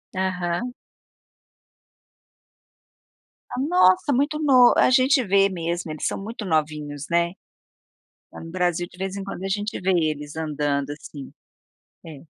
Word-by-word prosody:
Aham. 185 +5 -2 2.8
Ah, - - -4
nossa, 285 - +3
muito 290 +4 0
no 260 -5 +6
a - - +5
gente 260 +1 +4
vê 195 -1 +3
mesmo, 170 -2 -3
eles 155 - -5
são - - -3
muito 220 +2 -6
novinhos, 150 -3 -2
né. 170 0 +1 1.0
Lá - - -10
no 165 - -9
Brasil, 175 -1 0
de - - -17
vez 190 +1 -4
em 195 - -5
quando, 195 - -7
a - - -2
gente 205 +2 -2
vê 190 - 0
eles 155 -3 -1
andando, 145 -3 -2
assim. 145 -1 -9 0.7
É. 155 -2 -11
180 Hz, 135 wpm, -23 LUFS, 155-210 Hz, 2.8 s, no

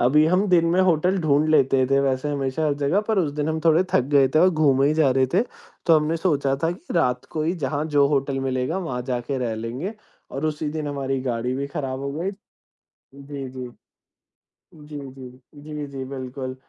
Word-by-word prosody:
अभी 150 +5 +4
हम 185 +4 +2
दिन 170 -2 +4
में 185 +2 +3
होटल 180 +1 +2
ढूँढ 150 0 +2
लेते 135 -3 +4
थे 135 - +4
वैसे 135 +1 0
हमेशा 140 +2 -1
हर 145 - +1
जगह 165 +9 +2
पर 220 -2 +2
उस 160 -6 +1
दिन 150 +1 -1
हम 160 0 -1
थोड़े 165 +2 +5
थक - - +5 0.2
गए 135 -2 +5
थे 155 - +5
और 185 +3 +6
घूमे 140 -5 +3
ही 155 - +1
जा 155 -4 +3
रहे 130 0 +3
थे। 195 - +4 0.4
तो 165 -2 +6
हमने 155 +2 -1
सोचा 145 -6 +1
था 165 - +2
कि 180 0 -9
रात 125 -7 +1
को 155 - -2
ही 160 +2 +1
जहाँ 145 +3 -1
जो 145 -2 +3
होटल 140 -1 0
मिलेगा, 130 +6 -1
वहाँ 145 -9 -3
जाके 125 +1 -3
रह 120 -3 -2
लेंगे 125 - -5 0.4
और 140 +4 -2
उसी 155 0 -2
दिन 155 0 -4
हमारी 135 -2 -2
गाड़ी 125 -1 -2
भी 140 +1 -2
खराब 135 -2 -4
हो 140 0 -4
गई। 170 +6 -2 0.8
जी, 140 0 -7
जी, 130 -1 -7 1.1
जी, 150 -1 -9
जी, 130 -1 -12 0.2
जी, 150 0 -6
जी, 135 -1 -6
बिल्कुल। 130 -1 -6
140 Hz, 210 wpm, -23 LUFS, 130-155 Hz, 1.1 s, और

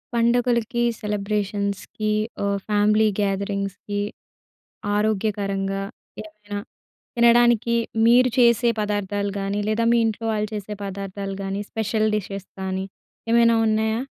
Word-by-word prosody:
పండగలకి, 235 0 +2 0.2
సెలబ్రేషన్స్‌కి 205 0 -2 0.3
ఆహ్, 200 0 +1
ఫ్యామిలీ 210 +1 +3
గ్యాదరింగ్స్‌కి 200 0 -2 1.0
ఆరోగ్యకరంగా 200 -2 -1 0.4
ఏమైన 210 -1 -11 0.6
తినడానికి 235 -1 +4 0.3
మీరు 245 +2 +6
చేసే 235 -1 +5
పదార్థాలు 205 -1 -1
గానీ, 195 +1 -2
లేదా 220 +2 +1
మీ 235 - +4
ఇంట్లో 225 +1 -3
వాళ్ళు 210 0 -1
చేసే 210 0 -5
పదార్థాలు 195 0 -5
గానీ, 195 +1 -3
స్పెషల్ 220 0 0
డిషెస్ 195 -1 -5
గానీ 190 0 -2 0.4
ఏమైనా 230 0 +5
ఉన్నాయా? 220 +1 +1
210 Hz, 100 wpm, -23 LUFS, 200-225 Hz, 1.0 s, మీరు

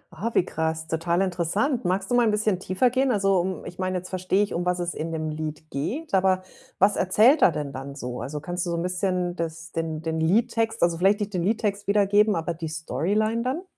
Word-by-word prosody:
Ah, 230 +3 -2
wie - - +4
krass, 160 0 -2
total 170 +3 0
interessant. 195 - 0
Magst 190 +3 -1
du - - +2
mal 240 - +5
'n - - +4
bisschen 210 -3 +1
tiefer 190 +7 +1
gehen? 265 +1 +2
Also, 195 -4 +2
um 185 +1 -3
ich 175 - -9
meine, 185 0 -1
jetzt 180 0 -7
verstehe 185 +2 +1
ich, 205 - -4
um 175 - -1
was 180 0 0
es 175 0 -2
in 165 +1 -4
dem 155 -1 -3
Lied 155 0 -6
geht, 250 - -4
aber 185 -1 +3 0.3
was 200 +1 +4
erzählt 220 - +4
er 175 - +6
denn 145 -3 -4
dann 135 +1 -7
so? 125 -3 -5
Also, 150 +3 -4
kannst 175 +3 -3
du - - -1
so 170 - -1
'n 170 - -2
bisschen 180 -1 -1
das 165 -1 -5
den 160 -1 -3
den 160 0 -2
Liedtext, 225 +6 +1
also, 170 -1 +2
vielleicht 195 +3 +4
nicht 205 0 -3
den 180 - 0
Liedtext 205 -1 -1
wiedergeben, 205 0 +4
aber 165 +1 -2
die 165 -1 -5
Storyline 200 - -1
dann? 260 +9 -2
185 Hz, 230 wpm, -25 LUFS, 165-205 Hz, 0.3 s, er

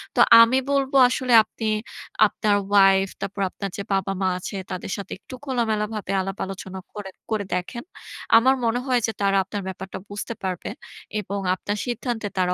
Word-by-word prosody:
তো - - 0 0.2
আমি 230 +3 +5
বলব 275 -1 +1 0.2
আসলে 255 -1 0
আপনি 220 +1 -6 0.6
আপনার 210 0 0
ওয়াইফ 195 -1 +5
তারপর 200 +1 -4
আপনার 200 +1 -5
যে 200 - -4
বাবা-মা 195 0 0
আছে 185 - -6 0.2
তাদের 185 - -5
সাথে 195 -1 -8
একটু 255 - -10
খোলামেলাভাবে 220 -5 -1
আলাপ-আলোচনা 190 0 -5
করে 205 -2 -7 0.2
করে 210 -2 0
দেখেন। 180 +7 -4 0.5
আমার 260 +3 +4
মনে 230 +1 +1
হয় 250 -2 +2
যে 225 - -1
তারা 195 0 +3
আপনার 200 +2 -5
ব্যাপারটা 190 0 -6
বুঝতে 205 +3 -5
পারবে, 185 -2 -3 0.5
এবং 200 0 -4 0.2
আপনার 205 +2 -4
সিদ্ধান্তে 240 -2 -3
তারা 180 -1 +2
205 Hz, 160 wpm, -23 LUFS, 195-230 Hz, 0.6 s, আমি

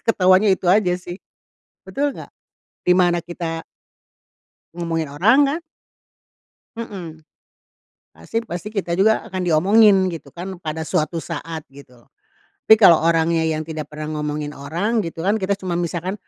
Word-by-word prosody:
ketahuannya 190 0 +4
itu - - -16
aja 185 -1 +4
sih. 175 0 -8 0.7
Betul 285 0 -2
nggak? - - -10 0.6
Di 180 - +5
mana 175 -1 +3
kita 165 -1 -5 1.1
Ngomongin 165 -3 -3
orang 220 - +4
kan. 305 +5 -2 1.2
Mhm. 175 -8 -8 0.9
Pasti 225 - -4
pasti 175 -2 -7
kita 175 -4 -2
juga 220 +3 +3
akan 185 0 -3
diomongin 190 +3 +4
gitu 155 -5 -9
kan 185 +2 -7
pada 160 -2 -5
suatu 160 +1 -1
saat, 165 -1 -6
gitu 135 -2 -16
loh. - - -32 0.6
Tapi 220 - +9
kalau 170 -6 +6
orangnya 165 0 +2
yang 155 -1 -1
tidak 155 -2 -6
pernah 150 0 -5
ngomongin 150 0 -4
orang 185 +11 -1
gitu 165 -1 -6
kan, 200 - +3
kita 195 +1 0
cuman 175 -3 -3
misalkan 175 +2 -3
175 Hz, 145 wpm, -21 LUFS, 160-190 Hz, 1.2 s, Tapi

